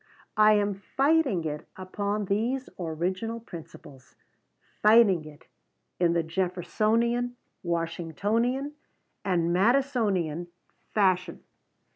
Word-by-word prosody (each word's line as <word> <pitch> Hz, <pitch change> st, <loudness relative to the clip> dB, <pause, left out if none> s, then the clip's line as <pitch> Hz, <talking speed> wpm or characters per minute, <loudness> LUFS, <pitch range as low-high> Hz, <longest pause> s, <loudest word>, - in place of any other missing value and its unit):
I 215 Hz, 0 st, +7 dB
am 205 Hz, -1 st, +2 dB
fighting 265 Hz, -, +1 dB
it 150 Hz, -1 st, -4 dB
upon 200 Hz, +2 st, -2 dB
these 235 Hz, +7 st, -1 dB
"original 185 Hz, +7 st, -2 dB
principles," 160 Hz, -, -12 dB, 0.7 s
fighting 210 Hz, -6 st, +5 dB
it 155 Hz, 0 st, -13 dB, 0.5 s
in 170 Hz, -1 st, +3 dB
the 170 Hz, -1 st, +1 dB
Jeffersonian, 215 Hz, +8 st, 0 dB, 0.3 s
Washingtonian, 195 Hz, -, -1 dB, 0.5 s
and 170 Hz, -3 st, +1 dB
Madisonian 200 Hz, -, +1 dB, 0.5 s
fashion. 185 Hz, -3 st, +1 dB
195 Hz, 85 wpm, -27 LUFS, 170-230 Hz, 0.7 s, I